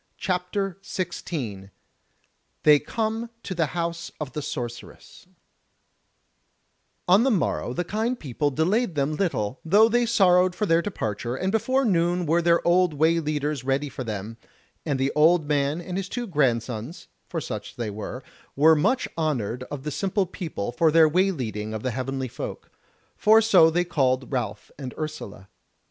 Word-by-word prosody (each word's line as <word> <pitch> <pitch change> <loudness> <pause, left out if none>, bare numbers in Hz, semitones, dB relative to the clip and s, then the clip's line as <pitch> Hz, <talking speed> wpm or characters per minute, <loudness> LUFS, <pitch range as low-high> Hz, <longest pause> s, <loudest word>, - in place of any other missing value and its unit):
CHAPTER 185 +1 -2
16 150 - -5 0.9
They 150 -1 +7
Come 225 +7 -3
to 190 - -4
the 165 -3 0
House 170 0 -3
of 145 -5 -5
the 150 - -3
Sorceress 120 -3 -7 1.8
On 185 +4 +6
the 265 - +3
morrow 190 - 0
the 175 - -2
kind 220 +7 -2
people 145 +1 -1
delayed 180 - 0
them 145 +1 0
little, 135 - -1
though 205 +7 +5
they 240 +1 +2
sorrowed 185 -5 +4
for 210 - -1
their 165 -3 +3
departure, 120 - -3
and 185 +7 -1
before 260 +5 +1
noon 175 -3 +1
were 165 +2 +2
their 170 0 +2
old 175 -2 +3
way 160 +3 +3
leaders 150 -3 -2
ready 135 +2 0
for 130 0 -6
them; 110 0 -5 0.5
and 140 -3 0
the 135 +1 +1
old 160 +1 +4
man 145 +1 +1
and 180 +1 -5
his 195 -1 -3
two 245 0 -3
grandsons 125 - -1 0.2
(for - - -3
such - - -6
they 115 -3 -3
were) 110 +5 -6 0.3
were 160 +3 +6
much 255 - +1
honoured 125 -7 -1
of 140 -2 -6
the 150 - -3
simple 195 +5 0
people 165 - -5
for 160 +6 +3
their 160 0 +6
way 185 +5 +3
leading 110 - -4
of 110 - -5
the 130 - -1
Heavenly 130 +2 -3
Folk; - - -7 0.4
for 220 +1 +5
so 190 -7 +6
they 175 +2 +1
called 130 -6 0
Ralph 110 -6 -3
and 130 -3 -6
Ursula. 150 -11 -6
155 Hz, 160 wpm, -25 LUFS, 130-185 Hz, 1.8 s, They